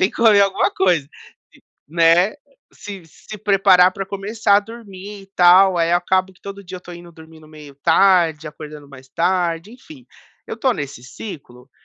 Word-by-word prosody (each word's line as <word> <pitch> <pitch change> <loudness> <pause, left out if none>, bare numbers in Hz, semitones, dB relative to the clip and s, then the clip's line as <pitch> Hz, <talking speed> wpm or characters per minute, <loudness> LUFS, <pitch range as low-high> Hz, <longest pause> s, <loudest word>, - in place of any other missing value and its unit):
tem 185 +3 +2
que - - -22
comer 220 -3 +5
alguma 195 -1 +1
coisa. 175 -7 0 0.4
Sim. - - -22 0.3
Né. 170 +4 +3 0.4
Se 200 -4 -10
se 210 +6 -12
preparar 190 -3 +4
para 195 - -5
começar 200 +1 0
a - - +3
dormir 205 -2 -11
e - - -17
tal, 180 +1 +5
aí 165 0 +1
eu - - +5
acabo 185 +1 -1
que 180 - -28
todo 200 0 -9
dia 185 +1 -9
eu - - -8
estou 175 -1 -12
indo 170 0 -13
dormindo 160 -1 -16
meio 150 -2 -14
tarde, 165 -1 +2
acordando 150 -1 -11
mais 130 -1 -15
tarde, 175 +3 -1
enfim. 260 +1 -15 0.4
Eu - - -6
estou 260 -3 0
nesse 140 -4 -7
ciclo, 130 - -11
180 Hz, 180 wpm, -19 LUFS, 160-200 Hz, 0.4 s, comer